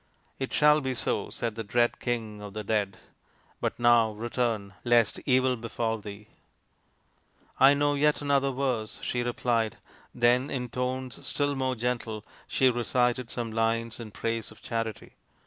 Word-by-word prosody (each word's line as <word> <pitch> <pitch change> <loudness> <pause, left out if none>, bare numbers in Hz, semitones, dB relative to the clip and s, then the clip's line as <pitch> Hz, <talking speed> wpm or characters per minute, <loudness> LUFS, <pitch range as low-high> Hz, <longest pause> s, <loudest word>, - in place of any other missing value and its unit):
" - - -39
It 135 - -3
shall 150 0 +5
be 130 -2 -2
so," - - -1
said 115 -2 -3
the 115 +1 -5
dread 120 +3 +1
King 110 -4 -3
of 105 0 -9
the 105 - -3
Dead; 100 -2 0 0.3
" - - -35
but - - -1
now 120 -2 +5
return, 115 -2 -2
lest 120 -3 +3
evil 130 -1 +4
befall 115 -1 -2
thee." 105 +1 -10 0.7
" - - -42 0.5
I 135 +2 +8
know 145 0 +2
yet 150 +1 +3
another 140 -1 +2
verse," 125 -5 -2
she 120 - -1
replied. 120 -2 0 0.4
Then 125 +3 +3
in 125 -2 -3
tones 125 +1 -3
still 145 0 0
more 130 -1 0
gentle 115 -2 -2 0.2
she 130 -1 +3
recited 120 0 0
some 115 -2 -4
lines 115 +1 0
in 115 -2 -7
praise 115 +1 -3
of 110 - -15
Charity. 115 -2 -4
120 Hz, 165 wpm, -28 LUFS, 110-130 Hz, 0.7 s, I